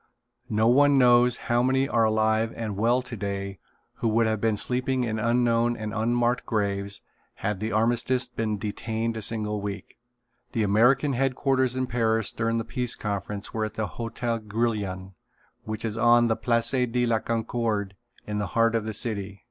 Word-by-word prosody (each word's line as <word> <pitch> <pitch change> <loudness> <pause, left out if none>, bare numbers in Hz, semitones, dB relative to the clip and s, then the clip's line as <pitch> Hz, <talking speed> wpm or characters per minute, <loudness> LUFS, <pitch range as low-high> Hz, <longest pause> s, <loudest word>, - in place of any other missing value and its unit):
No 110 +1 +2
one 140 +3 +5
knows 125 -1 +5
how 120 0 +2
many 130 +2 +2
are 115 -5 +2
alive 110 +1 +2
and 110 -3 -4
well 120 +5 +2
today 100 -5 -5 0.4
who - - -1
would 115 +1 +3
have 110 -2 0
been 110 -2 +1
sleeping 125 +3 0
in 110 -2 -2
unknown 120 +1 +2
and 110 -1 -5
unmarked 120 +2 +1
graves 100 -2 -2 0.3
had 105 -2 -3
the 110 +2 -3
armistice 120 +3 +1
been 115 -3 -2
detained 110 +2 -3
a 110 - -4
single 105 -1 -2
week. 100 0 -7 0.5
The 115 - +1
American 125 +8 +3
headquarters 130 0 +1
in 130 0 0
Paris 115 -3 +1
during 115 0 -1
the 115 - -2
Peace 125 -2 -3
Conference 100 -1 -4
were 110 -1 -1
in 110 - -6
the 110 - -1
Hotel 115 +1 -3
Grillion, 105 -4 -2 0.5
which 110 +1 -4
is 110 -1 -3
on 120 +1 +5
the 110 - +2
Place 115 0 0
de 125 -2 +1
la 115 -2 +2
Concorde 110 -3 -2 0.3
in 105 0 -3
the 105 - -1
heart 115 0 +4
of 115 -2 0
the 110 - -3
city. 100 -2 -3
115 Hz, 170 wpm, -26 LUFS, 105-120 Hz, 0.5 s, one